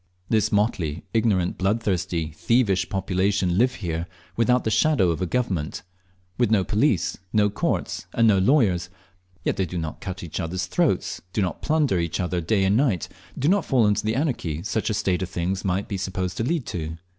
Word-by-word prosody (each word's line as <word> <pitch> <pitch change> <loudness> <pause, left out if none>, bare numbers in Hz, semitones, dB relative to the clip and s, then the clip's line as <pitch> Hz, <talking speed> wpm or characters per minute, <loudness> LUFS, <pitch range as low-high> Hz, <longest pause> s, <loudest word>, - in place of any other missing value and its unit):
This 110 -3 +2
motley, 95 -7 0
ignorant, 105 -6 +1
bloodthirsty, 95 -5 0
thievish 100 -6 +2
population 95 -1 +1
live 125 +1 +3
here 85 0 -2 0.3
without 125 +2 +3
the 110 - 0
shadow 110 - +3
of 85 - -3
a 90 - 0
government, 95 -10 -2 0.6
with 120 -4 +3
no 105 -3 +3
police, 105 - +1
no 105 -2 +3
courts, - - -2
and 115 -1 +3
no 100 -3 +5
lawyers; 95 - +3 0.5
yet - - 0
they 95 - +1
do 90 - -5
not 80 -2 -4
cut 95 -2 -5
each 85 - -5
other's 90 +2 -2
throats, 135 - 0
do 105 - +1
not 90 - -3
plunder 150 - +2
each 85 +2 -2
other 90 -1 -1
day 95 +4 +1
and 95 +2 +3
night, 115 - +1 0.3
do 140 - 0
not 200 +4 +3
fall 125 -5 +3
into 105 0 +2
the 110 +1 0
anarchy 115 - -1
such 105 +2 -1
a 110 - 0
state 95 -4 0
of 95 - -3
things 95 +2 -2
might 95 +1 -1
be 100 - -3
supposed 95 -1 -3
to - - 0
lead 150 +1 -1
to. 80 -5 -4
95 Hz, 190 wpm, -24 LUFS, 90-115 Hz, 0.6 s, no